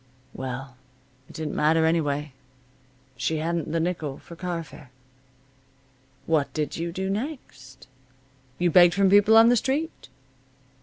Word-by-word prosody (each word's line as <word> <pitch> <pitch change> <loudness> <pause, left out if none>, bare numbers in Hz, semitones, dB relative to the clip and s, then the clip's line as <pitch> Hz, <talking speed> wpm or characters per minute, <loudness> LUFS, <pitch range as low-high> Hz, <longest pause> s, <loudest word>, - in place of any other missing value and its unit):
Well, 130 0 -7 0.5
it - - -14
didn't 155 -2 -4
matter, 160 +2 +3
anyway. 150 -3 -1 0.8
She 155 +5 -1
hadn't 165 0 -2
the 165 - 0
nickel 160 -5 -3
for 170 - -13
car 175 -1 -4
fare. 145 -2 -15 1.4
What 155 -3 0
did 150 -2 -3
you 170 +1 -4
do 190 +2 -4
next? 195 - -6 0.7
You 175 -1 +1
begged 175 0 +6
from 195 -1 +3
people 205 +2 +6
on 225 +1 +7
the 245 - +4
street. 285 +8 -3
165 Hz, 135 wpm, -25 LUFS, 150-190 Hz, 1.4 s, on